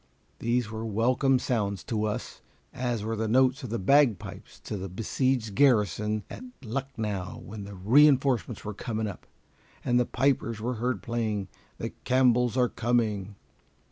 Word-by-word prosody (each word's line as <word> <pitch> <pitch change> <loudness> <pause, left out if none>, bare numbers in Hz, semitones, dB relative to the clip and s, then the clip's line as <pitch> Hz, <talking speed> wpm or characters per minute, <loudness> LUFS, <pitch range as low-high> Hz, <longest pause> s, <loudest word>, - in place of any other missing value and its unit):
These 120 -1 0
were 110 0 -5
welcome 120 +5 +2
sounds 105 -6 -1
to 110 -2 -1
us, 105 - -4 0.3
as 120 -4 -2
were 110 +1 -2
the 110 0 -1
notes 130 +3 +3
of 125 - -6
the 115 - -1
bagpipes 125 +1 +1
to - - -5
the 95 -1 -5
besieged 115 +3 -1
garrison 105 - +2
at - - -9 0.2
Lucknow 110 -6 -4
when 105 -1 -7
the 100 0 -9
re 120 +11 +6
enforcements 130 -6 +1
were 105 - -3
coming 110 +1 -3
up, 100 -3 -7 0.6
and 120 0 +3
the 125 - +2
pipers 125 -5 0
were 120 +4 -2
heard 120 -6 -1
playing 110 -5 -2 0.3
"The - - -4
Campbells 125 -1 +3
are 125 -1 +4
Coming." 110 -4 0
115 Hz, 155 wpm, -28 LUFS, 105-125 Hz, 0.6 s, re